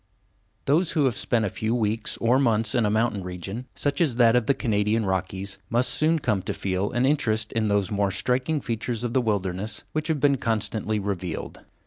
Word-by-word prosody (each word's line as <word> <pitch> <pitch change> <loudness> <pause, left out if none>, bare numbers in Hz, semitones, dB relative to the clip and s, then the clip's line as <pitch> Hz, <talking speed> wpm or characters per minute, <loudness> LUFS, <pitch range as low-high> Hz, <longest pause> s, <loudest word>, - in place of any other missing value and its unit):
_ - - -41
Those 160 +5 +2
who 150 -5 +2
have 125 -4 +1
spent 115 +1 0
a - - 0
few 110 +4 -2
weeks 110 -1 -1
or 120 +3 +3
months 115 -5 +2
in 115 -4 +2
a - - +1
mountain 110 -2 0
region, 95 +7 -6
such 145 +3 0
as 145 -8 +2
that 120 -1 +5
of 125 -3 +2
the 140 - +3
Canadian 110 -1 +1
Rockies, 95 +1 -2
must 120 +2 +2
soon 160 +2 +2
come 110 -10 0
to 95 - -4
feel 95 +1 -1
an 120 +1 +2
interest 110 -6 +1
in 110 -1 0
those 100 -2 +1
more 100 -1 +1
striking 130 - 0
features 115 0 -3
of 120 -1 -2
the 130 - +3
wilderness 100 -2 -2
which 155 0 -2
have 160 -3 0
been 140 0 +3
constantly 110 -2 -1
revealed. 95 -4 -4
115 Hz, 205 wpm, -25 LUFS, 100-125 Hz, -, that